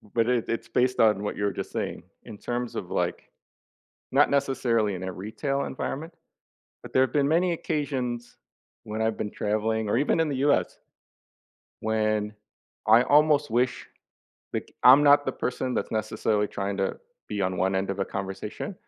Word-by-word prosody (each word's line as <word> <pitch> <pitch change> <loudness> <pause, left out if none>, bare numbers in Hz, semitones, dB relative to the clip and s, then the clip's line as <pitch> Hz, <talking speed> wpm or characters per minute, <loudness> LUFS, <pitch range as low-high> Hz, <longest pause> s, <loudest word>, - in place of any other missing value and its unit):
but 115 -1 +3
it 125 -2 +1
it's 115 0 -2
based 125 +2 +1
on 105 -2 +4
what 105 - -3
you 105 - -2
were 100 - 0
just - - -5
saying. - - -4 0.2
In 110 -3 -9
terms 120 +1 -4
of, - - -5
like, - - -2 0.8
not 145 +2 +4
necessarily 125 -6 +1
in 90 - -6
a 95 - -3
retail 135 +9 -3
environment, 155 +5 -5 0.7
but - - -11
there 130 - +4
have 130 -2 0
been 145 -2 +2
many 175 +3 +2
occasions 130 -7 -3 0.5
when 110 +1 -3
I've 110 0 0
been 105 - -3
traveling 110 +1 -1
or 105 - +1
even 150 +3 +2
in 160 - +2
the 140 - -2
U.S., 140 - +1 1.0
when 110 -1 0 0.5
I 115 +3 +7
almost 150 -2 +4
wish, 125 +2 0 0.7
like, - - -4
I'm 130 +3 +9
not 145 0 +6
the 130 - 0
person 125 0 -3
that's - - -2
necessarily 110 -1 0
trying 100 -1 -3
to 95 0 -1 0.3
be 105 -1 -3
on 95 0 -1
one 95 +1 +1
end 95 +1 -1
of 100 - -4
a - - +2
conversation, 95 - -5
115 Hz, 175 wpm, -26 LUFS, 105-135 Hz, 1.0 s, I'm